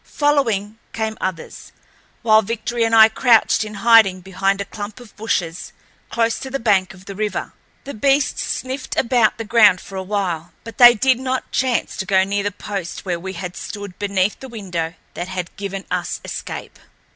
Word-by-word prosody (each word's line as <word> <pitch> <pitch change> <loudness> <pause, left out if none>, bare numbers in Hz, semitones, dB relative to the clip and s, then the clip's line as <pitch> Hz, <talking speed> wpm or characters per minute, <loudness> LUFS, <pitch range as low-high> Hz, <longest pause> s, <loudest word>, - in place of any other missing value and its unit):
Following, 230 -8 +1
came 220 -1 -2
others, 185 -4 -5 0.5
while 220 -1 +6
Victory 230 +2 -2
and 225 0 +2
I 220 -1 +9
crouched 225 -1 +3
in 215 0 -8
hiding 220 -6 +6
behind 195 +1 -1
a 200 - -2
clump 205 +3 -8
of 240 -4 -15
bushes 180 -6 -3 0.4
close 230 -1 0
to 265 - -6
the 275 - -2
bank 190 -5 +1
of 185 0 -17
the 200 - -7
river. 210 0 -3 0.3
The 280 - -7
beasts 275 +5 +1
sniffed 260 +2 -4
about 235 -4 +2
the 225 - -4
ground 210 -4 +5
for 195 +2 -9
a - - -2
while, 185 -4 -3
but 230 - -11
they 240 -1 +9
did 255 +2 +2
not 260 0 -3
chance 255 -3 0
to 190 - -4
go 190 -2 +4
near 200 +1 -1
the 205 -1 -3
spot 195 -4 -5
where 175 -3 -2
we 190 +2 -6
had 180 0 -6
stood 205 -3 -8
beneath 200 -1 0
the 265 - -9
window 180 -7 -4 0.2
that 175 - -5
had 180 -2 -5
given 195 -1 -5
us 175 -1 -2
escape. - - -7
205 Hz, 185 wpm, -20 LUFS, 190-230 Hz, 0.5 s, I